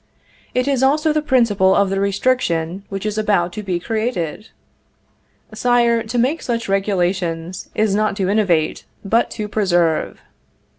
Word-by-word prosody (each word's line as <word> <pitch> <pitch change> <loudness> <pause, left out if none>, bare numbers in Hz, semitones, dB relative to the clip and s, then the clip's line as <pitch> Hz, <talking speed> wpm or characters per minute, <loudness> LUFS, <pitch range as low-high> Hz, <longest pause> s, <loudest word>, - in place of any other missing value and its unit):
It 250 +1 +1
is 275 -3 +1
also 300 +3 +2
the 305 - +1
principle 230 -9 +3
of 200 -1 +2
the 195 - 0
restriction 195 -4 0
which 195 +1 -5
is 215 0 -1
about 180 -5 +1
to 215 - -5
be 185 -4 -2
created. 215 -3 -3 1.0
Sire, 235 0 +2
to 225 +2 -4
make 265 +7 +1
such 235 -1 -2
regulations 185 -3 -1
is 215 -2 +1
not 215 0 +1
to 190 -3 0
innovate, 190 -6 +1 0.2
but 225 +4 +2
to 210 -2 -5
preserve. 175 -6 0
210 Hz, 145 wpm, -19 LUFS, 185-235 Hz, 1.0 s, principle